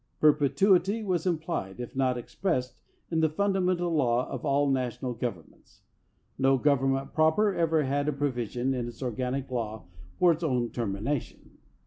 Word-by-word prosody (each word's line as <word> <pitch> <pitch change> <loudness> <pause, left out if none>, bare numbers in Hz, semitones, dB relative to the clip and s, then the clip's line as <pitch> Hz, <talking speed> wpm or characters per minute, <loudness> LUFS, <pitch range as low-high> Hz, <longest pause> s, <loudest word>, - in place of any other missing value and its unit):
Perpetuity 180 +8 +3
was 185 -3 -1
implied, 160 - -2
if 120 +1 -7
not 130 -2 +1
ex 120 - -9
pressed, 130 -10 -1 0.4
in 165 - +1
the 160 0 +3
fundamental 180 -1 0
law 125 -5 +2
of 130 - -5
all 140 0 +2
national 130 -1 -1
governments. 115 -9 -7 0.6
No 135 0 +4
government 135 0 +1
proper 160 +7 +3
ever 160 -3 +2
had 140 +2 -1
a - - +2
provision 130 -2 -1
in 125 -2 -2
its 120 +2 -8
organic 130 +2 -3
law 110 -3 -3 0.3
for 180 -1 +5
its 165 0 -2
own 125 -6 0
termina 115 +4 -1
tion. - - -18
135 Hz, 155 wpm, -28 LUFS, 125-160 Hz, 0.6 s, for